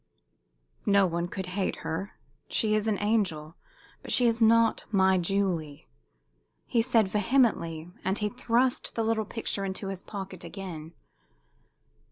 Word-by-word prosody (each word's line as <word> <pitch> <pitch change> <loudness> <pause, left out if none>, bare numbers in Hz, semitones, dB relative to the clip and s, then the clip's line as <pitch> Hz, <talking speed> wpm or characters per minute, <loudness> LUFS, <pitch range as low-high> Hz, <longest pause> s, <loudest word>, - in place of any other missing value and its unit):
"No 200 -1 +5
one 170 -1 -1
could 190 +1 -5
hate 195 -1 -1
her. 165 +6 -3 0.4
She 215 -2 +1
is 215 0 +1
an 210 -2 +1
angel. 185 -8 0 0.5
But - - -7
she 250 - +5
is 230 0 +2
not 225 0 +4
my 190 -2 +3
Julie!" 175 -5 -1 0.8
he 235 - +2
said, 225 -3 +3
vehemently, 190 -7 +1
and 190 +2 0
he 210 - 0
thrust 245 +2 0
the 230 - 0
little 220 -1 0
picture 210 -2 -3
into 195 0 -4
his 190 -1 -5
pocket 190 -3 -7
again. 170 -3 -8
200 Hz, 140 wpm, -28 LUFS, 180-225 Hz, 0.8 s, No